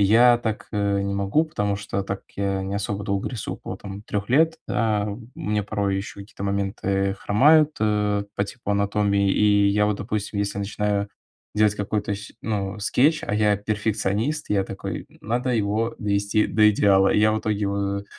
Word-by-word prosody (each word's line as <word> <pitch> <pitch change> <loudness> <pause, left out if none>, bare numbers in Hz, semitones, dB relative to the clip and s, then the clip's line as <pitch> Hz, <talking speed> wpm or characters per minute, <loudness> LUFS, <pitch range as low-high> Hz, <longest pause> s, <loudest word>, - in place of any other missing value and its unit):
Я 120 +4 +6
так, 110 -2 -4
э, 100 -1 0
не 100 0 -2
могу, 100 +11 +1
потому 105 -11 -1
что 100 -1 -3
так 100 0 -4
я 100 -1 -1
не 95 +1 -4
особо 100 0 -3
долго 100 -1 -1
рисую, 120 -6 -5
около - - -7
там 100 0 -8
3 100 -1 -4
лет. 160 +6 +4
Да, 105 -3 0
у 110 +3 -8
меня 105 -1 -1
порой 100 -2 -1
еще 100 +1 -6
какие-то 100 0 -8
моменты 100 -1 -1
хромают, 150 +8 +4
э, 105 -1 +1
по 100 - +1
типу 110 +1 -7
анатомии. 100 0 +1
И 105 -1 +4
я 105 +1 +2
вот, 105 - 0
допустим, 105 0 -3
если 100 0 -1
начинаю 100 0 -1 0.4
делать 105 -1 +3
какой-то 105 0 -2
сь 105 - -9
ну, 100 -2 -2
скетч, 150 +10 +2
а 105 - -1
я 105 -1 +3
перфекционист, 110 +6 -1
я 100 -2 +2
такой: - - -6
"Надо 120 +4 -1
его 110 +1 0
довести 100 +1 +1
до 105 0 +4
идеала". 95 -2 +4
И - - +3
я 105 +1 +4
в 110 - -1
итоге 105 -1 -1
его, 100 -1 -1
105 Hz, 180 wpm, -24 LUFS, 100-110 Hz, 0.4 s, Я